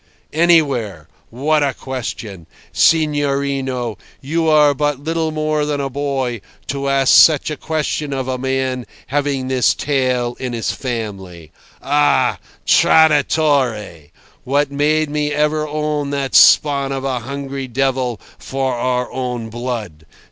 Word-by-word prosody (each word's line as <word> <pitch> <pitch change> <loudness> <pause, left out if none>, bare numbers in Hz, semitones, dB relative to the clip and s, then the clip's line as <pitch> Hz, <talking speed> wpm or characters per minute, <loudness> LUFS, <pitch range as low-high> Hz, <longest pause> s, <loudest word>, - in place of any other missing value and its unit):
"Anywhere. 140 - +2 0.2
What 150 +6 0
a 140 -2 0
question! 110 -8 -6 0.3
Signorino, 140 -6 +1 0.2
you 160 +4 -1
are 150 -2 +5
but 145 0 -1
little 160 +2 -2
more 155 -1 -1
than 145 -1 -2
a 135 -1 -3
boy 135 -4 -2 0.3
to 140 0 -2
ask 135 -1 +3
such 155 -1 +5
a - - -3
question 150 -1 -3
of 135 -2 -3
a 130 -1 -2
man 130 -1 -2 0.2
having 140 -2 -1
this 130 -1 +2
tale 130 -4 -1
in 125 -2 -4
his 115 -1 -2
family. 95 - -6 0.3
Ah! 145 +1 +2 0.3
Traditore! 140 - +2 0.3
What 140 +2 0
made 150 +1 +1
me 150 0 -1
ever 150 +1 0
own 150 -1 -2
that 140 -1 -3
spawn 140 -2 +5
of 135 -1 -3
a 130 -2 -1
hungry 135 +2 -6
devil 130 -2 -1 0.2
for 135 -1 -2
our 125 +1 -1
own 125 -3 -4
blood! 110 -10 -5
135 Hz, 130 wpm, -18 LUFS, 125-150 Hz, 0.3 s, are